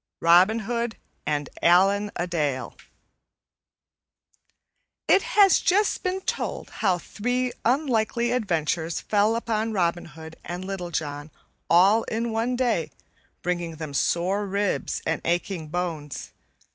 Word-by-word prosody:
Robin 185 Hz, +7 st, +5 dB
Hood 235 Hz, 0 st, -2 dB, 0.3 s
and 145 Hz, -1 st, -1 dB
Allan 195 Hz, +4 st, +4 dB
a 175 Hz, -, -1 dB
Dale 150 Hz, -7 st, -2 dB, 2.3 s
IT -, -, +5 dB
HAS 410 Hz, -6 st, +5 dB
just 405 Hz, +3 st, +2 dB
been 370 Hz, +1 st, -2 dB
told -, -, -3 dB
how 190 Hz, -4 st, +1 dB
three 245 Hz, +7 st, -2 dB
unlucky 240 Hz, -2 st, +1 dB
adventures 170 Hz, -7 st, -1 dB
fell 210 Hz, +2 st, +2 dB
upon 225 Hz, -1 st, -1 dB
Robin 175 Hz, -3 st, 0 dB
Hood 160 Hz, -1 st, -11 dB
and 180 Hz, +2 st, -6 dB
Little 190 Hz, -2 st, -4 dB
John 145 Hz, -2 st, -4 dB, 0.4 s
all 195 Hz, +6 st, +5 dB
in 230 Hz, +1 st, -2 dB
one 230 Hz, +3 st, 0 dB
day 235 Hz, -10 st, 0 dB, 0.5 s
bringing 175 Hz, -2 st, -2 dB
them 155 Hz, -2 st, -7 dB
sore 185 Hz, +8 st, 0 dB
ribs 200 Hz, +1 st, -1 dB
and 165 Hz, 0 st, -1 dB
aching 175 Hz, -1 st, -1 dB
bones. 155 Hz, -4 st, -4 dB
190 Hz, 120 wpm, -25 LUFS, 170-230 Hz, 2.3 s, Robin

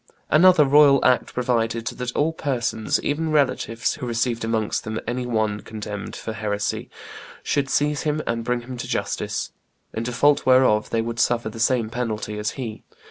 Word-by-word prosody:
Another 170 Hz, -1 st, +6 dB
royal 140 Hz, 0 st, +6 dB
act 125 Hz, -1 st, +3 dB
provided 115 Hz, -2 st, -1 dB
that 125 Hz, +1 st, -4 dB
all 155 Hz, +2 st, +1 dB
persons, 120 Hz, -7 st, -1 dB
even 160 Hz, +2 st, -1 dB
relatives, 130 Hz, -5 st, +1 dB
who 125 Hz, -, -6 dB
received 120 Hz, 0 st, -1 dB
amongst 110 Hz, -2 st, -1 dB
them 110 Hz, 0 st, -4 dB
any 125 Hz, +1 st, -3 dB
one 110 Hz, -3 st, 0 dB
condemned 105 Hz, -2 st, -7 dB
for 110 Hz, -, -5 dB
heresy 105 Hz, -1 st, -3 dB, 0.5 s
should 140 Hz, -2 st, 0 dB
seize 145 Hz, +1 st, +1 dB
him 155 Hz, -1 st, -1 dB
and 115 Hz, 0 st, -2 dB
bring 125 Hz, +1 st, -1 dB
him 125 Hz, +1 st, -8 dB
to 120 Hz, -, -5 dB
justice, -, -, -2 dB, 0.4 s
in 110 Hz, -, -3 dB
default 125 Hz, +5 st, +2 dB
whereof 130 Hz, -5 st, +4 dB
they 115 Hz, -1 st, 0 dB
would 115 Hz, 0 st, -4 dB
suffer 120 Hz, -2 st, +1 dB
the 115 Hz, -, -9 dB
same 115 Hz, -1 st, +1 dB
penalty 110 Hz, -3 st, -3 dB
as 105 Hz, 0 st, -1 dB
he. 115 Hz, -5 st, -5 dB
120 Hz, 170 wpm, -23 LUFS, 110-135 Hz, 0.5 s, Another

